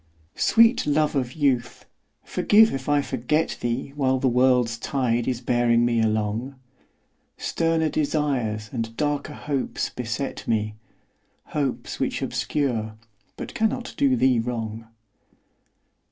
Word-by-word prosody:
Sweet 230 -4 +4
love 150 +1 +2
of 130 -2 -1
youth, 130 -6 0 0.4
forgive 220 +2 +4
if 135 +1 -4
I 145 -1 +3
forget 140 +6 -1
thee 120 +3 -2
While 130 -2 +2
the 130 - +1
world's 125 -2 +3
tide 120 -2 0
is 125 -2 -1
bearing 120 -1 +2
me 120 -1 +2
along; 110 +4 -1 0.8
Sterner 165 -1 0
desires 135 -9 -1
and 115 -2 -4
darker 150 0 -1
hopes 140 -3 -2
beset 125 +3 -4
me, 110 -2 0 0.8
Hopes 140 -4 -3
which - - -1
obscure 115 -7 -2 0.4
but - - -7
cannot 225 +3 -1
do 275 -2 +3
thee 130 - +3
wrong. 115 -1 -4
130 Hz, 120 wpm, -24 LUFS, 115-150 Hz, 0.8 s, Sweet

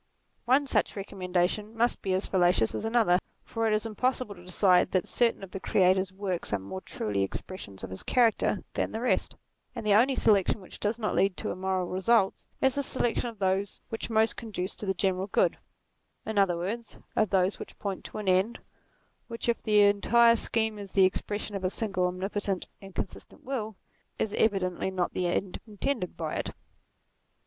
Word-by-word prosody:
One 265 +4 +4
such 270 - 0
recommendation 195 +2 -2
must 240 +2 +1
be 190 - -1
as 190 - -1
fallacious 175 - +2
as - - -3
another, 225 -6 +3 0.2
for 225 -1 -1
it 215 - +2
is 215 +1 0
impossible 250 +1 -1
to 175 -2 -15
decide 180 0 +3
that 185 -2 +1
certain 235 -4 +1
of 190 - -9
the 195 - -5
Creator's 185 0 +2
works 190 -2 -3
are 100 - +2
more 100 - -7
truly 105 - -2
expressions 100 - -5
of 95 - -6
his 95 - -5
character 230 -4 +2
than - - -1
the 220 - -2
rest; 250 - 0 0.4
and - - -5
the 210 - +4
only 250 +6 +5
selection 210 -3 +3
which 185 - -11
does 210 +2 0
not 215 -3 -1
lead 195 -2 +2
to - - -2
immoral 185 0 -1
results, 190 +3 +1
is 265 -1 +4
the 280 - 0
selection 245 -3 -1
of 225 - -11
those 190 0 0
which 225 - -4
most 220 0 +3
conduce 205 -5 -4
to 205 - -5
the 190 - +1
general 190 +1 0
good, - - +2 0.7
in 220 -2 0
other 185 -3 +3
words, 215 +7 -4 0.2
of 215 - +2
those 190 +1 +2
which - - -9
point 195 -2 -4
to - - -7
an 210 -2 -5
end 190 +5 +2 0.7
which 230 0 -5
if 235 - +1
the 210 -2 +4
entire 230 +3 +5
scheme 220 -1 +1
is 200 -2 -9
the 190 -1 +6
expression 205 +2 -2
of 195 - -4
a 185 - +2
single 195 -3 0
omnipotent 195 +1 -2 0.2
and 195 -1 -12
consistent - - -6
will, 225 -5 -3 0.4
is 210 - -1
evidently 190 -4 +1
not 185 -2 -1
the 180 - 0
end 180 +2 -2
intended 215 -1 -3
by - - -3
it. - - -2
200 Hz, 190 wpm, -28 LUFS, 185-225 Hz, 0.7 s, the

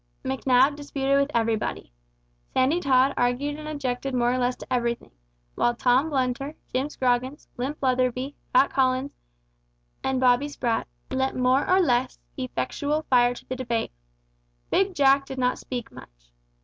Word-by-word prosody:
Macnab 265 +1 +3
disputed 275 -1 0
with 280 0 +1
everybody. 225 - -1 0.6
Sandy 270 +7 +3
Tod 270 -3 +3
argued 275 +5 0
and 305 - -8
objected 270 -3 -3
more 245 0 +2
or 255 - 0
less 250 0 +1
to - - -7
everything, 235 -1 -1 0.4
while 240 - +1
Tom 255 +6 +2
Blunter, 275 +1 -1 0.2
Jim 265 +3 0
Scroggins, 255 +1 -1
Limp 270 +5 -3
Letherby, 255 +1 0 0.2
Fat 260 +2 +4
Collins, 260 +1 +1 0.9
and 265 -1 0
Bobby 255 +2 +3
Sprat, 240 -5 -2 0.2
lent 265 0 0
more 255 +2 +2
or 370 +1 +5
less 255 -7 +1 0.2
effectual 285 - -2
fire 245 -1 +4
to - - -12
the 255 - -3
debate. 235 -3 -2 0.8
Big 385 -1 +2
Jack 275 -1 +4
did 265 - -7
not 250 -1 0
speak 245 -2 -6
much. - - -15
260 Hz, 150 wpm, -25 LUFS, 245-280 Hz, 0.9 s, or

